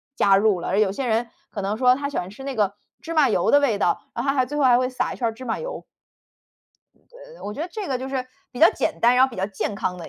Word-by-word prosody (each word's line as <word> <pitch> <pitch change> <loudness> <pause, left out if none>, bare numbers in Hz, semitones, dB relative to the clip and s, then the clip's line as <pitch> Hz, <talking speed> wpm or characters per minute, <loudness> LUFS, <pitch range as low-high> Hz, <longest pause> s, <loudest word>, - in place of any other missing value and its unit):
加 195 -1 +4
入 205 -3 +2
了。 - - -5
而 195 +3 +1
有 200 -3 +3
些 255 +5 -3
人 230 +1 +1 0.2
可 200 - -5
能 200 +2 -1
说 250 0 +4
他 280 +1 -3
喜 - - -5
欢 180 - -3
吃 240 +7 -11
那 275 -2 -4
个 205 -2 0 0.3
芝 330 - -6
麻 305 -4 +4
油 - - +1
的 285 - +6
味 240 -8 +1
道， 175 - +1
然 235 - -3
后 275 - 0
他 275 - +1
还 255 -1 +2
最 295 +4 -5
后 290 - +2
还 245 -2 +6
会 255 0 +1
撒 255 - -2
一 - - -10
圈 235 - 0
儿 225 - -2
芝 255 - -11
麻 230 - -2
油。 - - -6 1.3
嗯， - - -14
我 210 - -4
觉 - - -7
得 350 - -4
这 425 -3 -5
个 255 -2 -1
就 260 +1 -5
是 260 -1 -3 0.2
比 250 - -10
较 330 - +8
简 - - -2
单、 240 +1 +5
然 260 - +7
后 265 - -2
比 - - -10
较 190 +1 -1
健 205 0 -4
康 180 -2 -3
的 170 - -9
250 Hz, 335 characters per minute, -23 LUFS, 205-275 Hz, 1.3 s, 较